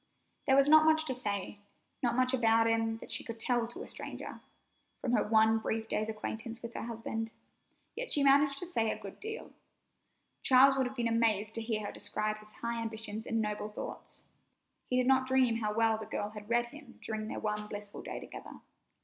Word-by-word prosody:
There 265 - +6
was 275 0 +6
not 310 +1 +8
much 315 0 +4
to 260 - -1
say, 205 -4 -3 0.4
not 240 -2 +1
much 255 +1 +3
about 225 -2 +4
him 225 0 +1
that - - -10
she - - 0
could 230 -1 -7
tell 240 0 +1
to 240 - -7
a - - -10
stranger, - - -6 0.6
from 245 - -2
her 230 -4 +3
one 220 +1 +4
brief 220 0 -2
day's 215 0 -1
acquaintance 220 +1 -5
with 235 0 -6
her - - -4
husband, 225 -1 -4 0.6
yet - - -4
she 285 - +3
managed 280 0 +5
to 355 - -1
say 230 -11 0
a - - -2
good 195 - -10
deal. 440 +1 -6 0.9
Charles 270 +1 +6
would 265 -1 +1
have 260 - -8
been 240 -2 0
amazed 220 -2 +2
to 225 - -2
hear 220 -2 -2
her - - -4
describe 215 +1 -2
his 215 0 -15
high 235 +1 -3
ambitions 220 -1 -4
and 225 -1 +1
noble 210 0 -3
thoughts. 210 - -7 0.6
He 250 - +1
did 255 - +3
not 260 0 +4
dream 260 -3 +3
how 215 -2 -1
well 225 -1 +3
the 215 - -7
girl 210 -1 -3
had 210 0 -10
read 240 0 +3
him 285 -2 -13
during 215 -1 -3
their - - -4
one 210 0 -2
blissful 205 -1 -7
day - - -6
together. - - -10
225 Hz, 210 wpm, -32 LUFS, 215-255 Hz, 0.9 s, not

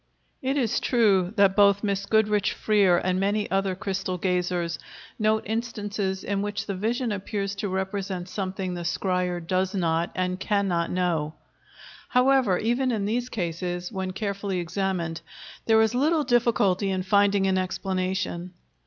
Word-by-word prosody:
] - - -44
It 280 - 0
is 240 -6 +1
true 200 -7 +3
that 200 -2 +4
both 200 0 +5
Miss 200 -1 -1
Goodrich 210 -2 +2
Freer 200 -5 +3
and 185 +1 0
many 205 +2 0
other 195 -1 +1
crystal 190 -2 -3
gazers 180 -3 -1 0.4
note 215 0 +2
instances 205 -4 -3
in 200 -1 -1
which 205 +1 -3
the 200 - -3
vision 225 +5 -1
appears 200 0 -3
to 200 0 -2
represent 190 -1 -3
something 190 -1 -3
the 175 - -4
scryer 180 +1 -1
does 185 +3 -1
not 165 -2 +1
and 185 0 -1
cannot 190 -4 0
know. 165 -4 -1 0.7
However, 250 -6 +3
even 245 +3 +1
in 210 -4 -1
these 240 +4 -1
cases, 175 -2 -3
when 190 -3 -3
carefully 200 0 -3
examined, 175 -2 -2 0.5
there 220 -1 +5
is 220 +1 +3
little 300 +5 +2
difficulty 220 -6 +2
in 185 -1 -1
finding 200 0 +3
an 190 -1 +2
explanation. 185 -1 -2
195 Hz, 150 wpm, -26 LUFS, 185-210 Hz, 0.7 s, both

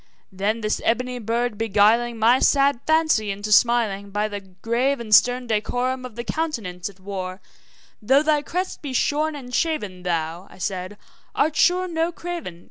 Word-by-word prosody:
Then 205 +4 -1
this 215 0 -1
ebony 250 +2 0
bird 230 0 -2
beguiling 225 +2 +3
my 235 +4 +4
sad 275 -2 +3
fancy 315 -9 +2
into 205 +2 -4
smiling, 210 -3 +3
By 205 +2 -1
the 205 -1 -5
grave 235 +8 -1
and 220 -2 -3
stern 245 +3 +5
decorum 245 +3 -1
of 245 -4 -9
the 235 - -5
countenance 225 - -3
it 195 -1 -17
wore, 185 -1 -5 0.6
`Though 270 +7 +4
thy 305 -1 +3
crest 365 +5 -4
be 280 -3 -5
shorn 300 +4 +1
and 250 -3 -9
shaven, 210 - -1
thou,' 170 +1 -3
I - - -16
said, 185 +1 -4 0.4
`art 310 +2 +2
sure 360 +4 +3
no 330 0 -1
craven. 335 - -6
235 Hz, 165 wpm, -23 LUFS, 200-280 Hz, 0.6 s, stern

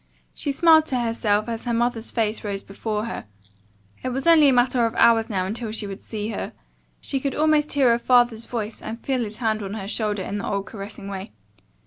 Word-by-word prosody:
She 285 - -2
smiled 315 +1 +5
to 255 - 0
herself 225 -2 0
as 230 0 -4
her 240 -1 0
mother's 235 -1 0
face 220 -2 -1
rose 200 -2 -3
before 210 +2 -3
her. 230 - -6 0.7
It 255 - -2
was 265 +2 -3
only 320 -4 +7
a - - +5
matter 245 -1 +3
of 230 - -6
hours 225 -1 +4
now 190 -4 -1
until 220 +3 -4
she 215 -1 -2
would 195 -1 -7
see 215 -1 -5
her. 220 - -4 0.5
She 270 - -2
could 275 0 -2
almost 305 -1 +2
hear 270 -4 +4
her 235 - +2
father's 240 -2 +3
voice 225 -2 -4
and 225 +2 -6
feel 265 -2 0
his 215 -2 -3
hand 220 -3 0
on 200 +1 -5
her 195 -3 -5
shoulder 210 -2 -1
in 205 +2 -4
the - - -4
old 200 -1 -1
caressing 200 -1 -8
way. 195 - -6
225 Hz, 215 wpm, -23 LUFS, 210-250 Hz, 0.7 s, only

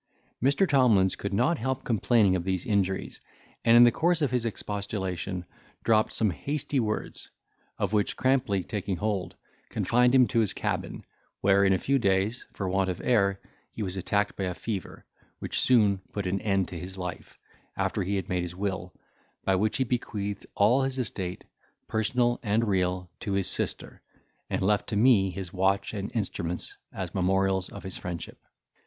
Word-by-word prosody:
Mr. 140 +9 +3
Tomlins 115 - +4
could 100 - -4
not 125 +11 +2
help 130 +2 -2
complaining 110 -3 +3
of 90 - -1
these 95 -1 -2
injuries, 95 -3 -1 0.4
and 115 +1 +6
in 120 - +10
the 120 - +7
course 165 +2 +1
of 140 - +1
his 125 -2 0
expostulation 95 -4 -3 0.4
dropped 110 -1 +3
some 110 -3 +2
hasty 140 - -2
words, 110 -3 -2 0.5
of - - -1
which 105 -1 +1
Crampley 125 -7 +1
taking 100 0 -3
hold, 100 -1 -2 0.3
confined 125 +2 +3
him 130 -1 +7
to 120 - +2
his 110 -3 +1
cabin, - - -3 0.4
where, 100 0 +4
in 95 - +4
a 95 - +4
few 135 +7 +1
days, 100 +2 +1
for 100 - -4
want 95 0 +1
of 90 - -3
air 100 -5 +2 0.3
he 110 - -4
was 95 -1 -3
attacked 100 +2 0
by 95 - -2
a 90 -1 -3
fever, 100 -4 -5 0.3
which - - -2
soon 105 -6 +4
put 100 -2 -3
an 95 +2 -1
end 95 -4 +1
to 85 - -6
his 95 +2 -8
life, 90 -2 -6 0.4
after - - 0
he 100 +3 -1
had 95 -3 -2
made 90 -3 0
his 90 0 -5
will, 95 -2 -3 0.5
by 95 - +3
which 105 +3 +1
he 130 - +2
bequeathed 105 -5 -3
all 115 +7 +4
his 135 0 -1
estate, 95 -7 -3 0.4
personal 120 +2 +1
and 110 0 +1
real, 90 -2 0
to 100 - -3
his 100 -1 +1
sister, - - -1 0.5
and - - -1
left 105 +1 +1
to - - -2
me 105 -4 +5
his 90 -1 -6
watch 100 +2 +1
and 100 -2 -4
instruments 90 -5 -2 0.2
as - - -5
memorials 95 0 +1
of - - -10
his 95 - -5
friendship. 85 -1 -6
100 Hz, 175 wpm, -27 LUFS, 95-115 Hz, 0.5 s, in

